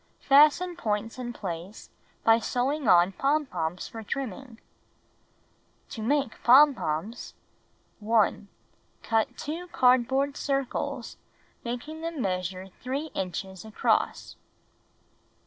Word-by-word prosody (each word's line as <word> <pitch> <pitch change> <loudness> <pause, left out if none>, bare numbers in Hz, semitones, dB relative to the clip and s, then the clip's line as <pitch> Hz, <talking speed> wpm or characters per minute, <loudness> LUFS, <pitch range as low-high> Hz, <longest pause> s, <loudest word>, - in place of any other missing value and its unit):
Fasten 305 +6 +5
points 225 -5 -3
in 240 -1 -4
place 185 -2 -7 0.3
by 225 0 +5
sewing 260 +4 -1
on 175 0 +6
pom 290 +8 +1
poms 170 -7 -4
for 225 - -8
trimming. 240 0 -6 1.3
To 225 - -7
Make 270 +1 0
Pompons 240 - +3 0.6
1. 215 -1 +1 0.6
Cut 225 -1 0
2 330 +4 -5
cardboard 265 0 +2
circles, 275 -2 -3 0.5
making 250 +7 -5
them 330 -2 -4
measure 185 -2 -3
3 275 +5 -3
inches 190 +1 -5
across. 220 -1 -1
240 Hz, 95 wpm, -27 LUFS, 205-280 Hz, 1.3 s, on